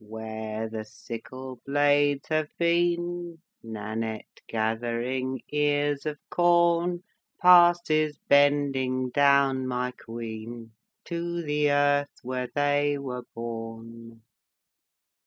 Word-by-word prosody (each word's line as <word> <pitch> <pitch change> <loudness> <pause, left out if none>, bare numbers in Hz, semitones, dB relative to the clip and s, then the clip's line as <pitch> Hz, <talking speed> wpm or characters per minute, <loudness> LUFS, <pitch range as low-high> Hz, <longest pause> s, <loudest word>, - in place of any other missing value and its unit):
"Where 110 0 -5
the 110 0 -5
sickle 125 +3 -9
blades 145 0 +2
have 155 -1 0
been, 175 0 0 0.2
Nannette, 110 0 -6
gathering 120 +3 -2
ears 145 0 0
of 150 -1 -3
corn, 175 0 +3 0.4
Passes 175 -4 +5
bending 135 -3 +2
down, 140 -1 +3
my 125 0 -2
queen, 115 -1 -8 0.3
To 170 0 -3
the 150 -1 +1
earth 145 0 +2
where 125 0 -3
they 145 0 +2
were 125 -3 -6
born." 115 0 -8
135 Hz, 90 wpm, -27 LUFS, 115-150 Hz, 0.4 s, Passes